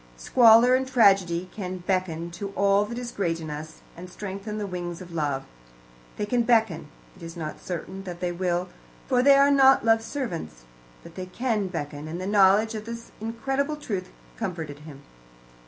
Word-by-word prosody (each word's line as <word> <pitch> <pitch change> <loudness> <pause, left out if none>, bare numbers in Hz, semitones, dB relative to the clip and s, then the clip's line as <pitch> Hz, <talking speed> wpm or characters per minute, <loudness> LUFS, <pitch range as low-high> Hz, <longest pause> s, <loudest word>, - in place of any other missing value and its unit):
Squalor 235 - +6
and 260 0 +2
tragedy 195 -8 +3
can 185 -3 -5
beckon 175 -3 -1
to 200 +4 -6
all 200 +1 +3
that 235 +3 -7
is 245 -1 -5
great 170 -6 -1
in 155 -2 -6
us, 155 +2 -8
and 180 +2 -10
strengthen 200 +3 -6
the 210 - -3
wings 175 -2 -5
of 180 -2 -11
love. 145 -4 -1 0.7
They 210 - -1
can 240 +3 +1
beckon; 225 -9 +2 0.3
it 185 - -18
is 165 +1 -8
not 155 -2 -6
certain 190 +2 -6
that 175 -2 -7
they 180 -1 -1
will, 180 0 -1 0.4
for 250 -2 +2
they 280 +2 +7
are 280 +1 +5
not 270 -3 +5
love's 225 0 +3
servants. 170 - -5 0.4
But - - -12
they 185 0 -6
can 220 0 -1
beckon, 150 -4 -5
and 165 +3 -5
the 185 - -4
knowledge 205 +2 +4
of 215 -1 -6
this 230 0 -8
incredible 270 +6 -2
truth 210 -11 -5 0.3
comforted 155 - -5
him. 150 -2 -12
190 Hz, 180 wpm, -25 LUFS, 170-230 Hz, 0.7 s, they